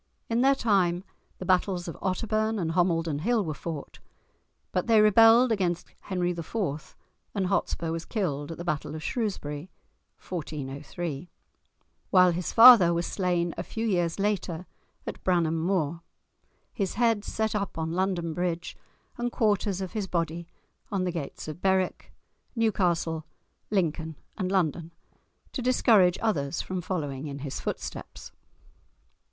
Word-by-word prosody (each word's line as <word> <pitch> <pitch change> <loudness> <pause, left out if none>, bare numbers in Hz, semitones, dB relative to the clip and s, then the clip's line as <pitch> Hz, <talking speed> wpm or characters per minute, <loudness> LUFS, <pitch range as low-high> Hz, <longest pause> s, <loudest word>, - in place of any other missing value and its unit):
In 230 +1 +2
their 275 +1 +5
time, 190 -7 +2 0.3
the 185 - -7
battles 185 -1 +1
of 170 - -5
Otterbourne 215 +3 0
and 165 -5 -1
Homildon 165 -3 +1
Hill 220 +4 +1
were 155 - -2
fought. 155 -1 -7 0.7
But 180 - -1
they 225 -2 +6
rebelled 225 +3 +6
against 180 -5 -1
Henry 180 -2 -1
IV. 170 -2 -4 0.4
and 195 -2 0
Hotspur 180 -3 -1
was 165 0 -4
killed 150 -9 -2
at 165 - -7
the 175 - -6
battle 155 -2 -2
of 155 - -6
Shrewsbury 185 - -3 0.5
(1403), 150 0 -5 0.8
while 180 -1 +6
his 175 +1 -3
father 225 -8 +9
was 170 +1 0
slain 175 -3 0
a - - -3
few 225 +5 -4
years 175 -6 +1
later 195 -4 -1 0.4
at - - -7
Bramham 165 -3 +2
Moor, 170 -3 0 0.7
his 195 -5 -2
head 230 -3 +2
set 220 0 -1
up 200 -4 -3
on 160 0 -2
London 175 -2 -1
Bridge, 175 0 -2 0.4
and 240 0 -1
quarters 205 -4 +1
of 190 - -4
his 210 -3 -2
body 170 -1 -2 0.4
on 195 -2 0
the 180 - 0
gates 160 -4 -6
of 155 +3 -7
Berwick, 190 -1 0 0.4
Newcastle, 175 -8 +1 0.5
Lincoln, 160 -5 -1 0.2
and 185 -3 -2
London, 170 -3 0 0.6
to 260 - -4
discourage 220 -7 +4
others 150 -7 0
from 185 -1 -3
following 150 -6 -3
in 140 -1 -6
his 135 - -4
footsteps! - - -6
180 Hz, 140 wpm, -27 LUFS, 165-205 Hz, 0.8 s, father